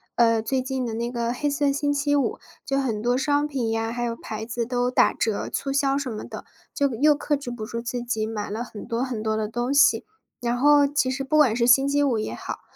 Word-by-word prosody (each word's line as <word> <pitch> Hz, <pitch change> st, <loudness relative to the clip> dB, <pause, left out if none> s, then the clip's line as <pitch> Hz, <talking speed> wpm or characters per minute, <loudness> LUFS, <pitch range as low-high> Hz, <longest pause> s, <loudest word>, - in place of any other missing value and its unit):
呃， 230 Hz, -2 st, +4 dB
最 260 Hz, +3 st, -1 dB
近 260 Hz, -1 st, -3 dB
的 225 Hz, -1 st, -4 dB
那 235 Hz, +1 st, -2 dB
个 235 Hz, -1 st, -2 dB
黑 290 Hz, +3 st, -1 dB
色 285 Hz, 0 st, +1 dB
星 285 Hz, 0 st, 0 dB
期 290 Hz, +1 st, 0 dB
五， 285 Hz, -2 st, +1 dB, 0.3 s
就 275 Hz, 0 st, -1 dB
很 230 Hz, -6 st, -1 dB
多 245 Hz, +2 st, +1 dB
商 290 Hz, +2 st, +1 dB
品 250 Hz, -6 st, -2 dB
呀， 225 Hz, 0 st, -1 dB
还 240 Hz, 0 st, -3 dB
有 235 Hz, -1 st, -2 dB
牌 220 Hz, 0 st, -6 dB
子 235 Hz, 0 st, -3 dB
都 245 Hz, 0 st, 0 dB
打 -, -, +4 dB
折 220 Hz, -3 st, -1 dB
促 275 Hz, -, -3 dB
销 275 Hz, 0 st, +1 dB
什 280 Hz, -2 st, -3 dB
么 215 Hz, -, -6 dB
的， -, -, -8 dB, 0.3 s
就 280 Hz, -1 st, +2 dB
又 295 Hz, +5 st, +4 dB
克 295 Hz, 0 st, -1 dB
制 275 Hz, -3 st, -7 dB
不 230 Hz, -3 st, -5 dB
住 230 Hz, +1 st, -5 dB
自 245 Hz, 0 st, -4 dB
己， 220 Hz, -3 st, -2 dB
买 210 Hz, -2 st, -4 dB
了 225 Hz, +4 st, -4 dB
很 215 Hz, -, -9 dB
多 230 Hz, +1 st, -2 dB
很 245 Hz, -5 st, -3 dB
多 220 Hz, 0 st, 0 dB
的 215 Hz, -1 st, -1 dB
东 240 Hz, +4 st, -2 dB
西。 285 Hz, -, +5 dB, 0.4 s
然 240 Hz, 0 st, 0 dB
后 290 Hz, +2 st, +5 dB
其 275 Hz, -2 st, 0 dB
实 265 Hz, +1 st, -3 dB
不 270 Hz, +3 st, +1 dB
管 265 Hz, -8 st, +5 dB
是 235 Hz, 0 st, +2 dB
星 270 Hz, +2 st, +6 dB
期 285 Hz, +1 st, +2 dB
五 255 Hz, -5 st, +1 dB
也 215 Hz, -, -3 dB
好 -, -, -6 dB
245 Hz, 275 characters per minute, -24 LUFS, 230-280 Hz, 0.4 s, 星